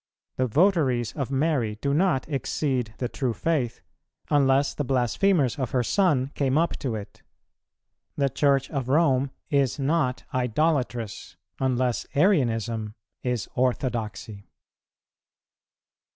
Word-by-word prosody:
The 130 - +1
votaries 140 - +2
of 135 -4 -3
Mary 135 -6 0
do 140 +2 0
not 160 -4 +1
exceed 130 -5 -2
the 125 - -2
true 125 -2 -2
faith, 135 -8 -1 0.5
unless 140 -1 +3
the 145 - -2
blasphemers 135 - +1
of 130 -3 -1
her 125 - +2
Son 145 - +2
came 135 0 +1
up 170 +1 +1
to 125 -6 -2
it. 105 -2 -9 0.9
The 140 - +2
Church 135 0 +2
of 135 -4 -3
Rome 140 -3 +3 0.2
is 135 -3 +2
not 140 -2 0
idolatrous, 125 -3 -1 0.2
unless 125 -2 0
Arianism 115 - +1 0.3
is 125 -3 -2
orthodoxy. 115 -5 -2
130 Hz, 115 wpm, -25 LUFS, 120-145 Hz, 0.9 s, unless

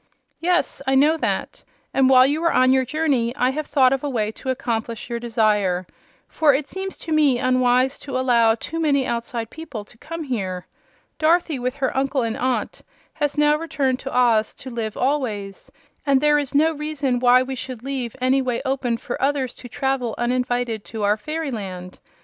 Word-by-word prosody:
"Yes; 350 -4 0
I 270 - +3
know 295 +4 +5
that. - - -2 0.3
And 265 -1 +4
while 255 -1 +7
you 295 +4 0
were 335 - +2
on 255 0 +4
your 265 0 +3
journey 265 -4 0
I 255 -2 +2
have 305 +2 -4
thought 265 -3 +4
of 270 - -2
a 290 - -1
way 215 -5 -1
to 260 - -7
accomplish 230 -2 -3
your 235 - -2
desire. 210 -6 +1 0.4
For 295 -4 +3
it 280 +1 -2
seems 385 0 -6
to 325 - -8
me 295 -5 +4
unwise 255 +1 +2
to 270 -3 -4
allow 235 -3 +3
too 325 +8 -5
many 280 -4 +2
outside 235 -1 -3
people 270 -10 -8
to 235 - -20
come 330 +1 -6
here. 190 -9 -3 0.5
Dorothy, 325 -2 +2
with 250 +2 -2
her 275 -2 -2
uncle 270 -1 0
and 225 -1 -2
aunt, 255 -1 -2 0.3
has 290 0 -2
now 295 0 +4
returned 280 -5 -1
to 270 - -6
Oz 230 -3 +3
to 260 - -9
live 225 -3 -4
always, 230 -8 -2 0.3
and 275 -2 +3
there 295 +1 +4
is 285 -1 -4
no 315 +3 +4
reason 295 -4 -2
why 250 +1 +5
we 265 +1 -5
should 255 -2 -6
leave 260 -4 -4
any 260 +2 +2
way 250 -2 -1
open 260 -3 0
for 240 - -6
others 270 -2 0
to 245 - -10
travel 265 -2 -1
uninvited 245 -2 -1
to 220 -2 -5
our 205 +1 +3
fairyland. 210 - -5
255 Hz, 190 wpm, -22 LUFS, 235-285 Hz, 0.5 s, while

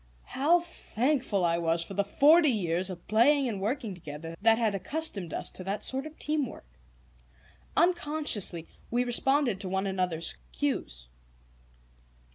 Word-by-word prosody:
How 325 +6 +2
thankful 255 - -1
I 170 0 +1
was 165 0 +1
for 195 - -8
the 200 - +1
forty 300 - +5
years 185 -5 0
of 175 -2 -9
playing 260 +6 +4
and 205 -5 -3
working 220 0 -2
together 165 -1 -8
that 225 +1 +5
had 225 -3 +1
accustomed 200 - -2
us - - -2
to 185 - -6
that 200 +2 -3
sort 265 +3 -1
of 310 - -13
team 300 -3 -1
work! - - -11 1.1
Unconsciously 300 - +1 0.2
we 240 +1 +1
responded 250 -2 +1
to 190 - -5
one 190 +1 -1
another's 180 - -1 0.2
cues. - - -2
215 Hz, 145 wpm, -29 LUFS, 180-280 Hz, 1.1 s, forty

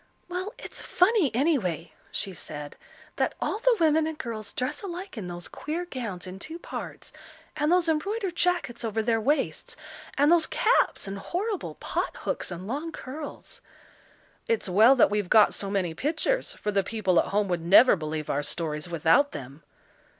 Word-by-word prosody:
"Well, 365 +3 -4
it's - - -8
funny 370 - +3
anyway," 190 - 0 0.2
she 195 - -2
said, 150 -3 -8 0.4
"that - - 0
all 425 - -1
the 485 0 +3
women 315 -1 +3
and 320 -1 -4
girls 225 -7 -5
dress 260 +4 -3
alike 375 0 -6
in 210 -6 -5
those 175 -1 -6
queer 330 +4 -4
gowns 230 - -5
in 185 +1 -8
two 320 +10 -6
parts, - - -8 0.4
and 300 +1 +1
those 355 -1 +4
embroidered 380 +4 -1
jackets 340 -10 0
over 220 -1 -1
their 225 0 +1
waists, 280 +4 -1 0.4
and 290 +3 +5
those 340 -2 +5
caps 450 - +2
and 195 0 -5
horrible 390 - -3
pot - - -3
hooks - - -2
and 175 +1 -6
long 290 +9 -3
curls." 290 +2 -8 0.9
"It's 460 - 0
well 220 +8 +6
that 240 - +5
we've 205 -3 -1
got 215 -1 +6
so 200 - -2
many 190 -4 0
pictures, 330 - -1
for 210 - -3
the 200 -1 +2
people 190 -4 +1
at - - +1
home 205 0 +1
would 175 -2 0
never 200 +8 +7
believe 155 -2 -4
our 145 - 0
stories 150 +2 -4
without 170 - +3
them." 135 +3 -8
240 Hz, 170 wpm, -27 LUFS, -, 0.9 s, never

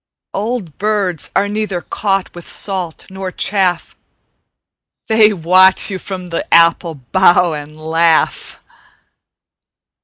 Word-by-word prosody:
Old 205 -6 -4
birds 200 -5 -1
are 200 - +2
neither 205 -3 -3
caught 195 -1 -2
with 175 -1 -11
salt 185 -5 -4
nor 190 -1 -6
chaff: 185 -3 -1 1.1
They 220 -1 +4
watch 185 +2 +3
you 190 - -4
from 185 -2 -7
the 170 - -4
apple 170 0 +3
bough 175 +5 +2
and 150 +1 -8
laugh. 160 +1 0
185 Hz, 110 wpm, -16 LUFS, 165-195 Hz, 1.1 s, They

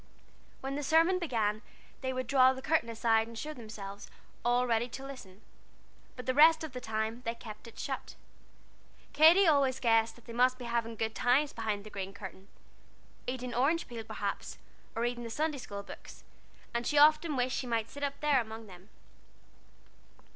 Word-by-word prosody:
When 270 +1 -3
the 290 - -2
sermon 330 +5 +4
began, 220 - 0 0.4
they 260 -1 -1
would 255 0 -3
draw 260 +1 +5
the 260 - -8
curtain 310 -7 +1
aside 225 -1 +2
and 230 0 -10
show 305 +6 -5
themselves, 210 -5 -9 0.3
all 245 +1 +3
ready 235 0 +1
to 270 +3 -7
listen, 220 -8 -11 0.7
but 250 - -8
the 255 - +1
rest 320 +3 +6
of 310 -5 -6
the 250 - -6
time 220 +1 -2
they 230 0 -2
kept 220 -1 -10
it 230 - -14
shut. - - -5 1.0
Katy 325 +7 +7
always 275 -5 +3
guessed 225 -2 +3
that 240 - -19
they 235 - -9
must 255 +2 +3
be 250 - -8
having 230 -1 -1
good 220 0 -2
times 260 +5 +2
behind 215 -3 -2
the 215 - -11
green 195 0 -5
curtain 190 -1 -9 0.8
eating 250 -1 -3
orange 290 +7 +1
peel, 235 -2 -6
perhaps, - - -4 0.4
or 230 - -1
reading 240 0 -2
the 230 - -5
Sunday 300 +4 -1
school 200 -4 -7
books - - -12 0.5
and 235 0 -1
she 295 - +1
often 305 +1 +5
wished 255 0 0
she 255 - -3
might 230 -1 -1
sit 285 - -9
up 280 0 -2
there 290 -4 +4
among 220 0 -8
them. 185 0 -14
245 Hz, 185 wpm, -31 LUFS, 225-275 Hz, 1.0 s, Katy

